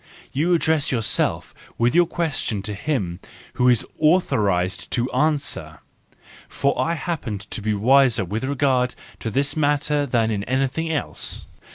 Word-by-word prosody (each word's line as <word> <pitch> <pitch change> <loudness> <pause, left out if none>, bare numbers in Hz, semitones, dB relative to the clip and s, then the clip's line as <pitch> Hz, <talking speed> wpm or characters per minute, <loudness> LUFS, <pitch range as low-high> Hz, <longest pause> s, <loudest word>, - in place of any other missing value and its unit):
You 165 +6 +2
address 160 -3 +1
yourself 115 -4 0 0.2
with 120 +1 +2
your 175 0 +5
question 145 - -2
to 105 0 -3
him 100 - -2 0.3
who 125 0 +3
is 120 -3 +3
authorised 105 - +1
to 120 +1 -1
answer, 150 -2 0 0.7
for 140 - 0
I 170 - 0
happen 150 - -3
to 100 +3 -7
be 105 0 0
wiser 120 -1 +4
with 105 +7 -3
regard 130 -2 +1 0.2
to 115 - -3
this 140 +6 0
matter 145 -1 +1
than 115 -3 +1
in 100 -2 -2
anything 135 +5 -1
else. 150 - -3
130 Hz, 145 wpm, -22 LUFS, 110-150 Hz, 0.7 s, your